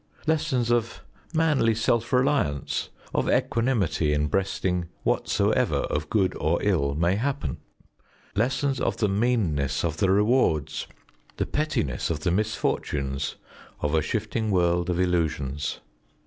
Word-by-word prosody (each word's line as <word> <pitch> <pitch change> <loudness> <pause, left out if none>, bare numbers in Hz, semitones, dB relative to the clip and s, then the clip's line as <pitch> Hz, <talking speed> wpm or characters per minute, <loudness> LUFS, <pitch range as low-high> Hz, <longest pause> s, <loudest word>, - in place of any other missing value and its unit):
Lessons 150 -7 +1
of 115 -1 0 0.3
manly 150 -9 +2
self 115 +1 +1
reliance, 125 - +1 0.2
of - - +1
equanimity 110 - +1
in 75 0 +1
breasting 90 -1 0 0.2
whatsoever - - +1
of 75 +1 -2
good 100 -4 +1
or 80 +3 +1
ill 75 -9 +1
may 85 +5 +2
happen. 125 - -2 0.8
Lessons 130 +4 +1
of - - 0
the 105 - +2
meanness 95 - +1
of 80 -2 -2
the 95 - +2
rewards, 100 - +2 0.5
the - - 0
pettiness 145 - -1
of 80 -3 -2
the 90 - +1
misfortunes 75 -8 -1 0.4
of 75 +1 -1
a 80 - +3
shifting 110 +6 -2
world 90 -2 +2
of 90 0 0
illusions. 80 -5 -1
95 Hz, 125 wpm, -26 LUFS, 75-120 Hz, 0.8 s, a